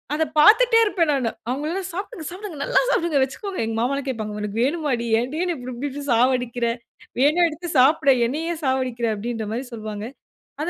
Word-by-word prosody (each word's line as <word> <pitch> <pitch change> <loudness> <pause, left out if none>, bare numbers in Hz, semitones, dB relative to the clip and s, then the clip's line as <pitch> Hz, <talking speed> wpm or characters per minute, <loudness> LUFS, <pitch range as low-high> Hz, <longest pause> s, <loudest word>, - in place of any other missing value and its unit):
அத 320 - +1 0.2
பார்த்துட்டே 455 +6 +6
இருப்பேன் 340 -7 +1
நானு. 250 -4 0 0.2
அவங்கள 290 +5 -2
எல்லாம், 380 -1 -4
"சாப்பிடுங்க, 370 -4 -6
சாப்பிடுங்க. 370 -4 -8
நல்லா - - +3
சாப்பிடுங்க, 330 -5 +1
வெச்சுக்கோங்க." 375 - -4
எங்க 225 0 -3
மாமாலாம் 275 +2 -1
கேட்பாங்க, 215 -4 -4
"உனக்கு 210 +2 -2
வேணுமாடி, 275 -5 -1
ஏன்டி 275 +6 -4 0.2
இப்டி 255 -1 -7
இப்டி 280 +4 -3
இப்டி 285 +1 -6
சாவடிக்கிற. 245 0 +1 0.6
வேணா 310 +5 +4
எடுத்து 330 +3 -7
சாப்பிடே. 280 +1 +5
என்னை 300 +6 -3
ஏன் 320 - -9
சாவடிக்கிற?" 255 -3 0
அப்படின்ற 225 0 -4
மாதிரி 250 +2 -4
சொல்வாங்க. 215 -1 -6 0.6
அது 335 - -1
275 Hz, 175 wpm, -22 LUFS, 240-325 Hz, 0.6 s, பார்த்துட்டே